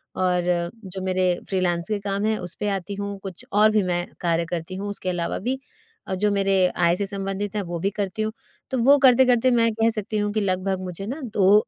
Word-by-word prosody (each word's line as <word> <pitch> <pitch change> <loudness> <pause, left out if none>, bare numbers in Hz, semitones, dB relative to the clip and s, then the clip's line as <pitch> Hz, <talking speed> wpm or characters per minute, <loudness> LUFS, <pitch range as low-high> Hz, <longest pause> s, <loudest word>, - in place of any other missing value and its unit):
और 180 -1 +1 0.2
जो 190 0 -6
मेरे 185 0 +1 0.2
फ्रीलांस 175 -2 0
के 210 -1 -1
काम 200 +1 -2
हैं, 220 0 +1
उस 180 -1 -5
पे 210 - 0
आती 195 +2 -6
हूँ, 200 0 -4
कुछ 190 -3 -8
और 210 +2 +5
भी 210 -2 +3
मैं 175 -1 -1 0.2
कार्य 170 -1 +1
करती 175 +1 -4
हूँ 200 +2 -4
उसके 185 -2 -4
अलावा 175 -2 -2
भी, 255 +6 -2 0.5
और 190 - -1
जो 205 +2 +1
मेरे 195 -2 +3
आय 170 0 +4
से 200 - -2
संबंधित 195 +1 -3
हैं 205 - 0
वो 170 - -2
भी 195 +4 +1
करती 205 +1 -3
हूँ। 215 0 -1 0.4
तो 260 - 0
वो 280 +3 +7
करते-करते 255 0 +5
मैं 230 -1 +3
कह 225 +1 +2
सकती 215 +1 -3
हूँ 205 0 0
कि 215 - +1
लगभग 190 0 0
मुझे 185 +2 -6
ना 275 +6 -4
2 205 +1 +5
195 Hz, 225 wpm, -24 LUFS, 185-210 Hz, 0.5 s, वो